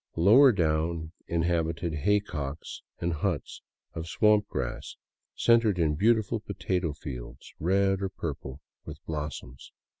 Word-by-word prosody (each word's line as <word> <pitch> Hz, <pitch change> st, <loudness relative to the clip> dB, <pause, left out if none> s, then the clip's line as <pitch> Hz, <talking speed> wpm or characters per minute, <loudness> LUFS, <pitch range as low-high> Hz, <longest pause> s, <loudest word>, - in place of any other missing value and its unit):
Lower 120 Hz, +11 st, +7 dB
down, 80 Hz, -3 st, 0 dB, 0.2 s
inhabited 85 Hz, 0 st, 0 dB
haycocks 75 Hz, -4 st, -2 dB, 0.2 s
and 85 Hz, 0 st, -1 dB
huts 80 Hz, -1 st, -3 dB, 0.3 s
of 80 Hz, 0 st, -5 dB
swamp 105 Hz, +4 st, +3 dB
grass -, -, -4 dB, 0.4 s
centered 115 Hz, -4 st, +3 dB
in 80 Hz, -3 st, +2 dB
beautiful 110 Hz, +5 st, +2 dB
potato 95 Hz, -5 st, -2 dB
fields, 65 Hz, -5 st, -9 dB
red 95 Hz, +3 st, +2 dB
or 95 Hz, -, -1 dB
purple 70 Hz, -5 st, -6 dB, 0.2 s
with -, -, -8 dB
blossoms. 75 Hz, -5 st, -6 dB
85 Hz, 115 wpm, -28 LUFS, 75-100 Hz, 0.4 s, Lower